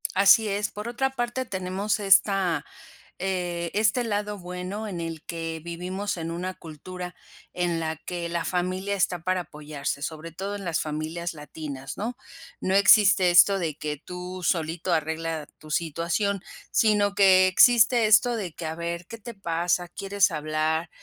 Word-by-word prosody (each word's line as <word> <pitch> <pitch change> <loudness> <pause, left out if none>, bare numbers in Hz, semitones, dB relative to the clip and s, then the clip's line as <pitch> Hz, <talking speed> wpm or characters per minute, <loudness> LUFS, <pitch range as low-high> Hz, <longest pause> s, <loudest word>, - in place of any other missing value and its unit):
Así 200 +3 +6
es. 205 +1 -1
Por 210 +2 -6
otra 265 +3 0
parte, 240 0 -2
tenemos 190 +2 -2
esta, 195 -3 +3 0.5
eh, 175 -2 -2
este 215 +4 +2
lado 210 -2 -2
bueno 180 +4 -5
en 180 -4 -5
el 165 -2 -5
que 165 -1 -5
vivimos 180 +4 -4
en 165 0 -4
una 180 +2 -4
cultura 180 +3 -8 0.4
en 175 -2 0
la 160 -1 -3
que 170 +1 -5
la 170 0 -2
familia 185 +2 -1
está 180 -2 0
para 185 0 0
apoyarse, 150 -3 -5
sobre 160 +2 -5
todo 195 +5 -5
en 200 - -7
las 165 -2 0
familias 160 +3 -4
latinas, 150 -2 -7
¿no? 235 +4 -4 0.4
No 190 - 0
existe 200 -2 +6
esto 195 +3 +6
de 160 -4 -2
que 150 -1 -4
tú 180 0 -7
solito 170 +1 0
arregla 160 0 -2
tu 155 0 -12
situación, 170 +5 -1 0.3
sino 210 -2 +3
que 190 -2 +6
existe 235 +3 +5
esto 225 +3 +5
de 190 -7 -4
que 165 - -7
a 160 0 -3
ver, 170 +1 -4
¿qué 230 - -8
te 230 +2 -9
pasa?, 175 -2 -1
¿quieres 195 0 +1
hablar? 155 +1 -1
180 Hz, 160 wpm, -26 LUFS, 165-200 Hz, 0.5 s, Así